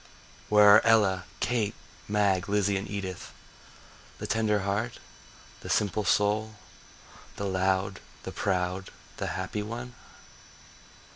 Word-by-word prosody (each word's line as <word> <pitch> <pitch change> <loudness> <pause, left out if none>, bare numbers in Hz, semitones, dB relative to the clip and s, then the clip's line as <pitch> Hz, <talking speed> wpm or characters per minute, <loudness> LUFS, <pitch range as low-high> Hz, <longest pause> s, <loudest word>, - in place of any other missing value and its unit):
Where 105 0 +7
are - - +4
Ella, 100 -5 +3 0.2
Kate, 110 -4 0 0.3
Mag, 100 -2 +1
Lizzie 100 -1 +2
and 95 +1 -3
Edith, 95 -3 -5 0.9
The - - -6
tender 110 -2 +1
heart, 100 +5 -2 0.6
the - - -9
simple 105 0 +1
soul, 105 +3 +1 0.8
the 100 - -4
loud, 95 0 0 0.2
the - - -6
proud, 95 -1 -1 0.3
the - - -3
happy 95 +3 -3
one? 120 +3 -6
100 Hz, 115 wpm, -28 LUFS, 95-105 Hz, 0.9 s, Where